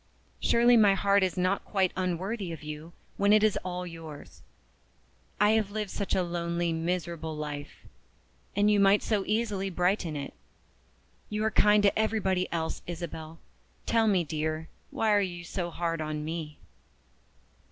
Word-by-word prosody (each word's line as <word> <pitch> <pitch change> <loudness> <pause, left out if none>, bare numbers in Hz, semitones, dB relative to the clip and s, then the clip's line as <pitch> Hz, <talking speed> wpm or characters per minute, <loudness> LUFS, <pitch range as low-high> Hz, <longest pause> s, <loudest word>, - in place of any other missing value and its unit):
Surely 240 +1 +4
my 205 -4 +6
heart 200 +1 +3
is 185 -2 0
not 185 +2 +1
quite 190 -3 +1
unworthy 185 +2 -2
of 160 -2 -8
you, 150 +2 -7 0.3
when 200 +1 +3
it 215 0 +6
is 215 -2 +3
all 180 0 -4
yours. 165 -4 -10 1.0
I 210 +1 +5
have 220 -2 +2
lived 210 -1 -4
such 200 - -2
a 185 - +2
lonely, 170 -1 -1
miserable 165 -1 -3
life 150 -1 -6 0.7
and 205 +1 +4
you 205 - +4
might 200 +1 +5
so 210 -3 0
easily 210 -3 0
brighten 180 -2 0
it. 140 -1 -5 1.0
You 210 0 -2
are 220 - +1
kind 210 0 +5
to 200 +1 +3
everybody 195 -4 0
else, 165 -1 -2
Isabel. 165 -2 -6 0.5
Tell 225 -1 +3
me, 190 -4 +3
dear, 155 0 -3 0.2
why 220 -1 0
are 205 -1 +4
you 175 -3 -4
so 175 +1 -3
hard 165 -1 -2
on 155 -1 -3
_me? 160 -2 -5
180 Hz, 155 wpm, -29 LUFS, 165-205 Hz, 1.0 s, my